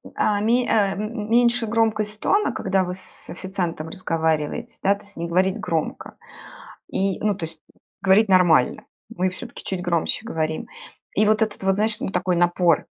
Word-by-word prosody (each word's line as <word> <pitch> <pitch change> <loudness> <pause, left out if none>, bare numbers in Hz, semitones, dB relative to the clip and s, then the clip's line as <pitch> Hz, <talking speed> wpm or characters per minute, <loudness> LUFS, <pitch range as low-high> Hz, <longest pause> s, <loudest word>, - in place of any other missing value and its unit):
А, 205 -1 +1
ме 240 +3 +2
э, - - -6 0.3
м 200 - -4
м 210 -3 -5
меньше 235 0 +3
громкость 215 -1 0
тона, 415 +1 +2
когда 190 0 0
вы 180 0 -4
с 190 - -11
официантом 175 -3 -4
разговариваете, 160 +4 -2
да 200 +1 +3
то 200 - -16
есть 205 - -17
не 170 - -4
говорить 185 +4 +1
громко, 165 -5 -3 0.7
и 195 -1 -1
ну 210 -1 +1
то 170 - -4
есть 160 -1 -9 0.4
говорить 200 +2 +4
нормально. 175 -8 +4 0.3
Мы 185 -4 0
всё-таки 185 - -9
чуть 190 -2 -3
громче 170 0 0
говорим. 160 -7 -2 0.5
И 215 - +4
вот 215 +1 +3
этот 215 -1 -1
вот, 195 0 +3
знаешь, 215 +2 +1
ну 265 - -3
такой 180 -2 0
напор 175 -1 +3
190 Hz, 175 wpm, -23 LUFS, 175-215 Hz, 0.7 s, говорить